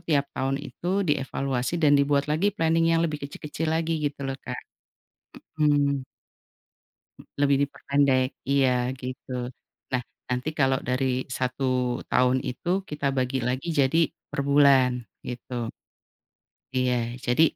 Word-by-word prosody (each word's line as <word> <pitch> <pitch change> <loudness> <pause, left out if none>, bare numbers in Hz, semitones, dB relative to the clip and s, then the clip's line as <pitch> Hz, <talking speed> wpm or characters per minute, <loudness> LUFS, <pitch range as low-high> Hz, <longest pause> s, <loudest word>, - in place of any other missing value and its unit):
tiap 140 -2 +1
tahun 135 +1 -1
itu 175 - -6 0.2
dievaluasi 135 -1 -1
dan 145 -1 +6
dibuat 140 0 +4
lagi 155 +7 +1
planning 165 0 +3
yang - - +2
lebih 150 -2 -2
kecil-kecil 150 +3 -4
lagi 160 0 0
gitu 145 -2 -2
loh, 135 0 -3
Kak, 125 -1 -5 1.0
mhm. 145 -3 +2 1.4
Lebih 140 -1 +4
diperpendek, 140 -2 +2 0.2
iya 135 -2 +4 0.3
gitu, 130 0 -7 0.6
nah 125 -1 +1 0.3
nanti 125 +4 -1
kalau 135 -1 +3
dari 130 +1 +1 0.3
1 130 +1 -1 0.5
tahun 125 +1 +4
itu 125 +7 -5 0.2
kita 150 -1 -3
bagi 130 +1 0
lagi 130 +6 -2
jadi 135 +3 +3 0.3
per - - -2
bulan 140 -3 +6 0.4
gitu. 125 +1 -7 1.2
Iya, 130 -1 +2 0.3
jadi, 125 +6 +4
140 Hz, 125 wpm, -26 LUFS, 130-150 Hz, 1.4 s, dan